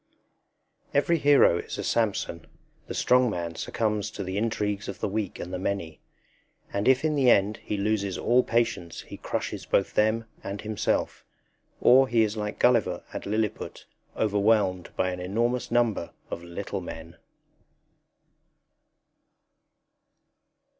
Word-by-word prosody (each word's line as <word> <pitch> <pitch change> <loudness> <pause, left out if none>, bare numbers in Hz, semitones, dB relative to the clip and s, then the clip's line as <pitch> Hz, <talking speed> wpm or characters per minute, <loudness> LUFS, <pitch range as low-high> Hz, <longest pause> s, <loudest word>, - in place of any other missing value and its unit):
Every 165 +4 +3
hero 140 -12 +5
is - - -6
a - - -3
Samson. 100 -7 -1 0.4
The - - -5
strong 125 0 +4
man 85 -4 -3
succumbs 105 +3 -1
to 100 - -6
the 95 0 -4
intrigues 105 -2 -1
of - - -6
the - - -1
weak 105 -1 -3
and 90 - -7
the 90 - -2
many; 90 -5 -3 0.7
and 100 +1 -1
if 130 +3 +4
in 155 - +2
the 135 -4 +4
end 100 -1 +4
he 105 - -4
loses 100 -2 0
all 125 +2 +3
patience 115 -9 -1
he - - -10
crushes - - -4
both 100 - +1
them 110 +2 +2 0.2
and 100 +1 -5
himself. 110 -1 -1 0.6
Or 130 +2 +6
he 115 -2 +3
is 110 0 -1
like 105 -1 -4
Gulliver 120 -4 +2
at - - -5
Lilliput, 110 0 -2 0.3
overwhelmed 105 -3 +2
by 95 - 0
an 90 - -5
enormous 115 +7 -1
number 115 -8 +1 0.2
of - - -4
little 85 0 -5
men. 80 +1 -9
105 Hz, 140 wpm, -27 LUFS, 95-115 Hz, 0.7 s, Or